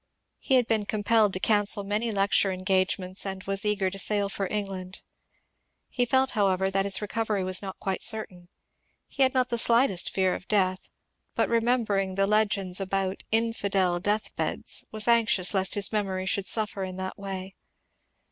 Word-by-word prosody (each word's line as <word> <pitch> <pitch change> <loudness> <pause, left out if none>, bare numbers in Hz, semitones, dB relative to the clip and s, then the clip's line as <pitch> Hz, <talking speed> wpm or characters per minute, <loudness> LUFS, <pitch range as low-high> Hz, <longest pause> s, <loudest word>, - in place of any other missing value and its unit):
He 265 - +1
had 250 -2 +4
been 215 -2 0
compelled 215 0 +2
to 185 - -1
cancel 205 0 +2
many 210 +3 -1
lecture 195 -1 +2
engagements 185 0 -1
and 190 -1 -5
was 195 0 -2
eager 205 -3 0
to 195 - -7
sail 205 0 0
for 195 -1 -3
England. 195 -2 -5 0.9
He 245 -2 -1
felt, 265 +1 +2
however, 190 -2 +1
that 195 0 +1
his 200 +1 0
recovery 210 -1 -2
was 185 0 +2
not 195 -2 -7
quite 190 -2 -3
certain. 190 -6 -3 0.6
He 275 - -6
had 260 0 +4
not 255 -1 +2
the 235 - 0
slightest 230 -6 +3
fear 190 -1 0
of - - -7
death, 185 -3 0 0.5
but - - +1
remembering 225 -5 +1
the 195 0 +2
legends 200 -3 +1
about 195 0 -1
^^ - - -15
infidel 200 -5 0
death 205 +4 -2
beds," - - -1
was 215 0 -1
anxious 225 -6 +3
lest 190 -1 +3
his 205 -1 +2
memoiy 190 -3 -2
should 195 0 0
suffer 210 -1 -1
in 185 -1 -6
that 190 +1 -6
way. 195 -1 -7
200 Hz, 175 wpm, -26 LUFS, 190-215 Hz, 0.9 s, had